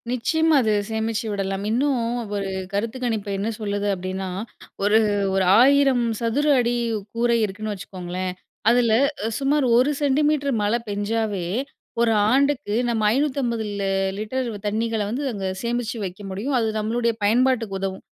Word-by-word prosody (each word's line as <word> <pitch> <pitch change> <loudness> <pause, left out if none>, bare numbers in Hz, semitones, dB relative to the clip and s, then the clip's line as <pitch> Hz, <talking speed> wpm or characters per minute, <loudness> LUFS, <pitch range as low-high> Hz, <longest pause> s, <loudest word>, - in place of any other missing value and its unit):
நிச்சயமா, 315 +6 +2
அது 220 -3 +1 0.2
சேமிச்சு 220 0 -2
விடலாம் 195 0 -2
இன்னும் 265 +4 +1 0.4
ஒரு 200 -1 -2 0.2
கருத்து 220 +5 -2
கணிப்பு 220 -4 -2
என்ன 200 +3 -1
சொல்லுது? 205 -1 -2
அப்டீன்னா 185 +1 -4 0.5
ஒரு, 210 +2 +5 0.3
ஒரு 190 0 +2 0.2
1,000 270 -1 +5 0.2
சதுர 235 +6 0
அடி 240 0 +1 0.4
கூரை 235 0 +2
இருக்குன்னு 215 +1 -2
வச்சுக்கோங்களேன். 185 -1 -5 0.4
அதில 235 -1 +3 0.5
சுமார் 280 +1 +2
1 255 +4 +4
சென்டிமீட்டர் 285 0 +2
மழை 210 +3 +1
பெஞ்சாலே 205 -2 -1 0.6
ஒரு 235 -1 +3 0.2
ஆண்டுக்கு 275 -4 +1 0.2
நம்ம 220 -2 +1
550 260 -4 0 0.6
லிட்டர் 250 +4 -2 0.2
தண்ணீகல 220 0 -1
வந்து 255 +7 -2
அங்க 195 -2 -3 0.2
சேமித்து 240 0 -2
வைக்க 185 +2 -7
முடியும். 230 +9 -2
அது 225 - +1
நம்மளுடைய 230 +2 0
பயன்பாட்டுக்கு 230 -2 +2
உதவும் 190 -1 -4
225 Hz, 130 wpm, -23 LUFS, 205-255 Hz, 0.6 s, ஒரு